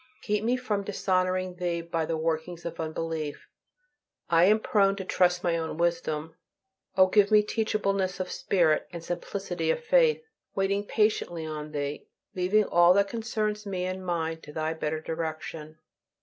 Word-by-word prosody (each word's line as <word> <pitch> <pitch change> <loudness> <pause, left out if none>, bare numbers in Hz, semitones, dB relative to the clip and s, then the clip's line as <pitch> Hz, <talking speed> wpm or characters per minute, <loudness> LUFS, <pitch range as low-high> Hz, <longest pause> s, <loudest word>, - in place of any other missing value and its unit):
Keep 210 -1 0
me 245 +3 +2
from 215 -5 -2
dishonoring 185 -2 0
Thee 175 -1 -1
by 165 -1 -2
the 165 - -1
workings 165 +2 -2
of 170 -1 -5
unbelief; 160 -1 -4 0.8
I 170 +1 +6
am 215 +3 +5
prone 200 -2 +3
to 195 -1 -6
trust 180 -1 +2
my 170 -2 +2
own 160 -1 -4
wisdom, 165 -2 -1 0.6
O 185 - +8
give 200 +1 +4
me 210 -1 +6
teachableness 200 -4 -1
of 185 -1 -3
spirit 165 -5 +2
and 170 -1 -7
simplicity 175 - -3
of 485 0 0
faith, 475 -1 +4 0.3
waiting 200 +1 0
patiently 210 -6 0
on 155 -1 -5
Thee; 145 -1 -4 0.3
leaving 190 +4 +3
all 175 0 +5
that 200 0 +3
concerns 215 -2 -2
me 185 -2 -2
and 185 0 -4
mine 165 -2 -2
to 150 - -11
Thy 155 +1 -2
better 155 -1 -3
direction. 160 -1 -5
180 Hz, 160 wpm, -28 LUFS, 160-200 Hz, 0.8 s, O